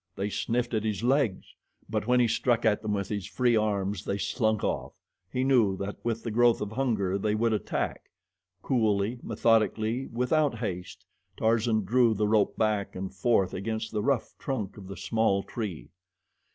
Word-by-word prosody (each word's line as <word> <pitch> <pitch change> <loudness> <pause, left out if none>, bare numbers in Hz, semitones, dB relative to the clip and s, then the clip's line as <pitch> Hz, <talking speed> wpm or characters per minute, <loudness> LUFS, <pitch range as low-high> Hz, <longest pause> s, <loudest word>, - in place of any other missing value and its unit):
They 100 +2 -2
sniffed 120 +3 -1
at 110 -1 0
his 110 0 -2
legs; 125 -6 +1 0.3
but - - -2
when 125 0 +4
he 120 - +4
struck 120 +1 +1
at 105 -2 +3
them 110 - -3
with 100 -2 -2
his 100 -2 -3
free 120 +1 +2
arms 100 -2 0
they 100 - -2
slunk 110 0 0
off. - - -2 0.4
He 130 - 0
knew 120 -8 +3
that 100 +1 -4
with 115 -1 -2
the 115 - -3
growth 120 +1 +4
of 105 0 -4
hunger 110 -6 0
they 105 +1 0
would 115 +1 +1
attack. 105 - -3 0.5
Coolly, 110 -2 +1
methodically, 115 +2 +1
without 125 +3 +1
haste, 90 -3 -5 0.3
Tarzan 110 -1 +2
drew 120 +2 +3
the 105 +1 +1
rope 105 -1 +2
back 105 -2 0
and 95 +1 -5
forth 95 -1 +2
against 110 +3 -3
the 105 - -1
rough 125 +1 0
trunk 110 -8 -3
of 100 -3 -11
the 100 - -8
small 100 -1 +1
tree. 105 -9 -6
110 Hz, 175 wpm, -28 LUFS, 100-120 Hz, 0.5 s, when